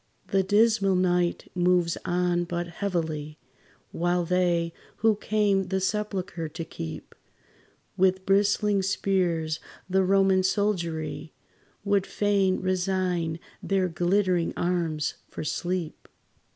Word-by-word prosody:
The 195 - +3
dismal 205 0 +3
night 180 -1 +1
moves 175 -1 +2
on 175 0 +1
but 175 0 -3
heavily, 160 -4 -3 0.5
While 175 +1 0
they, 175 -1 +1 0.2
who 220 -1 +3
came 205 -2 +1
the 190 0 0
sepulchre 190 -4 -2
to 165 +2 -6
keep 80 - -7 0.8
With 190 0 +2
bristling 200 +1 +3
spears, 180 -5 0 0.3
the 190 +1 +2
Roman 195 0 +4
soldiery, 175 -6 -1 0.5
Would 200 -1 +1
fain 200 -2 +1
resign 185 -3 0 0.2
their 190 -2 +1
glittering 175 +1 +1
arms 165 -4 0 0.2
for - - -6
sleep. 175 +1 -3
185 Hz, 105 wpm, -26 LUFS, 170-195 Hz, 0.8 s, Roman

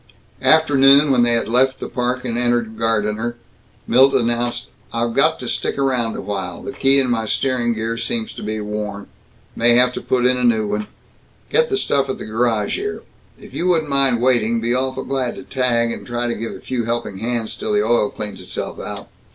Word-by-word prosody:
After 160 -2 +4
noon, 140 +2 +6
when 125 -2 +4
they 120 0 +3
had 115 - 0
left 130 +3 +2
the - - -5
Park 125 +1 -2
and 120 -2 -2
entered 120 -2 0
Gardiner, 110 +1 -1 0.5
Milt 135 +3 +5
announced, 120 -1 -1 0.2
"I've 115 0 -1
got - - +2
to - - -5
stick - - -1
around 125 -5 0
a - - -5
while. 95 -3 -5
The - - -5
key 135 +1 +3
in 135 -2 +2
my 115 -2 -1
steering 125 -1 0
gear 115 +1 -3
seems 225 - -3
to - - -9
be 110 +1 -3
worn. 105 -1 -4 0.5
May 120 +1 +4
have 125 +1 +4
to - - -5
put 125 -1 0
in 125 0 +3
a 125 - -2
new 110 -3 +3
one. 105 0 -2 0.6
Get 475 0 +3
the 400 - +1
stuff 140 - +1
at 130 - -3
a - - -6
garage 110 - 0
here. 415 +2 -4 0.4
If - - -14
you 180 - -1
wouldn't 160 -5 +1
mind 135 -4 +3
waiting, 115 -3 +2
be 115 +1 0
awful 130 +1 -1
glad 130 -3 -2
to - - -9
tag, 120 -3 0
and - - -6
try 120 0 -3
to 120 - -1
give 115 0 -5
a - - -9
few 120 -3 -3
helping 115 -4 -3
hands 115 0 -2
till - - -4
the 105 0 +3
oil 115 -2 +2
cleans 105 -3 -6
itself 90 - -5
out." - - -7
120 Hz, 215 wpm, -20 LUFS, 115-130 Hz, 0.6 s, noon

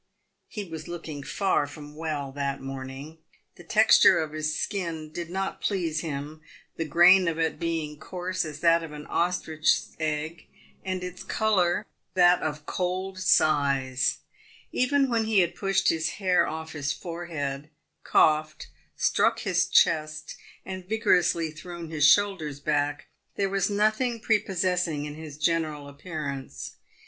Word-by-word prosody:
He 210 - -5
was 165 -4 -8
looking 165 -4 -6
far 185 0 0
from 150 0 -11
well 150 -3 -3
that 140 0 -3
morning. 135 +3 -8 0.4
The - - -14
texture - - +6
of 155 -1 -2
his 155 0 -2
skin 165 -6 -3
did 170 +1 -6
not 195 +2 -3
please 170 -6 -1
him, 155 -1 -5 0.3
the 165 - -3
grain 175 +3 +6
of 165 -1 -1
it 160 0 -1
being 160 -3 -3
coarse 185 +2 -3
as 155 -2 -7
that 170 0 +5
of 160 -2 -8
an 150 0 -8
ostrich's 160 -3 0
egg, 155 +1 -3 0.4
and 185 -1 -3
its 180 0 -7
colour 200 -3 +1 0.3
that 180 -1 +5
of 150 -1 -4
cold 185 +2 -3
size. 140 -6 +2 0.5
Even 275 +2 +2
when 230 -3 +1
he 215 -3 +4
had 175 -1 0
pushed 195 -1 +1
his 160 0 0
hair 185 -3 +2
off 160 0 -5
his 145 -2 -2
forehead, 155 -5 -5 0.3
coughed, 155 0 +2 0.3
struck - - +2
his - - +1
chest, 155 -1 +2 0.3
and 185 -1 -7
vigorously 180 -7 +2
thrown 170 +1 -9
his 155 -2 +4
shoulders 165 -7 +2
back, 145 0 -1 0.3
there 195 -1 0
was 195 0 0
no 210 +1 +3
thing 235 +1 -2
prepossessing 180 -8 0
in 150 - -6
his 155 -2 -9
general 155 -2 -1
appearance. 140 -2 -6
165 Hz, 145 wpm, -27 LUFS, 150-185 Hz, 0.5 s, texture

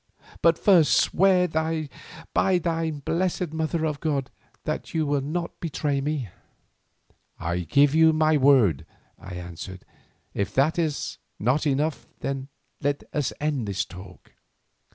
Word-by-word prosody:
But 165 0 +4
first 180 -7 +5
swear 185 0 +3
by 160 -1 -1 0.7
thine 165 -3 -1
blessed 180 -1 -1
Mother 160 0 -1
of 150 -2 -2
God 140 -5 -1 0.3
that - - -4
you 160 -1 +2
will 145 -1 +1
not 170 +5 -4
betray 145 -3 -1
me." 140 -6 -2 1.1
"I 85 +1 -1
give 140 - +3
you 160 0 +6
my 155 0 +3
word," 130 - +4 0.3
I 95 -2 -8
answered; 90 +2 -8 0.5
"if 100 - -2
that 155 +5 +3
is 155 -3 -2 0.2
not 130 +8 +1
enough, 145 +2 0 0.7
let 145 0 -1
us 145 -4 0
end 145 -7 -1
this 95 -2 -1
talk." 90 0 -13
150 Hz, 130 wpm, -25 LUFS, 130-160 Hz, 1.1 s, you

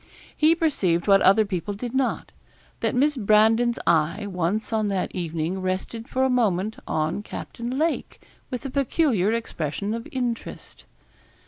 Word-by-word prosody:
He 315 +2 +4
perceived 195 - +1
what 195 -1 +6
other 205 +3 +5
people 200 +1 -3
did 240 +3 -5
not, 265 -1 -1 0.5
that - - -1
Miss 290 +4 +3
Brandon's 225 +1 +3
eye 170 +5 +2
once 195 +4 -2
on 215 -1 +1
that 195 -2 -2
evening 170 +1 -3
rested 190 +5 -3
for 260 - 0
a - - +4
moment 220 -5 +1
on 155 +5 -1
Captain 235 +4 -6
Lake 320 +2 -1 0.3
with 250 0 -5
a 270 - -4
peculiar 265 - +1
expression 205 -3 -3
of 230 0 -5
interest. 245 -3 -5
215 Hz, 145 wpm, -24 LUFS, 185-245 Hz, 0.5 s, what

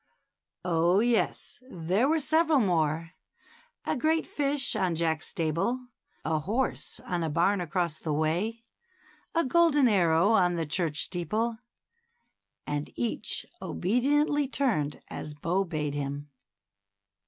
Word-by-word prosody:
Oh, 175 +2 +3
yes; 235 0 0
there 185 +6 +1
were 320 +2 +2
several 315 +1 +3
more, 165 - +1 0.4
— - - -30
a - - 0
great 315 +4 +1
fish 285 -1 0
on 180 -3 +1
Jack's 160 -1 0
stable, 200 +10 -1 0.4
a 155 0 +1
horse 220 - -2
on 175 -1 -2
a 165 - -1
barn 175 +5 +2
across 170 -2 -1
the 160 - -3
way, 175 +10 -1 0.7
a 335 - +3
golden 295 -1 +4
arrow 175 -2 +4
on 180 -5 +4
the 165 -1 -1
church 155 0 0
steeple, 215 +7 -1 0.5
— 475 0 -49
and 145 0 -3
each 235 - -2 0.2
obediently 285 - +1
turned 220 - 0
as 150 - -6
Bo 170 +6 0
bade 150 -4 -2
him. 145 0 -4
180 Hz, 130 wpm, -28 LUFS, 160-255 Hz, 0.7 s, golden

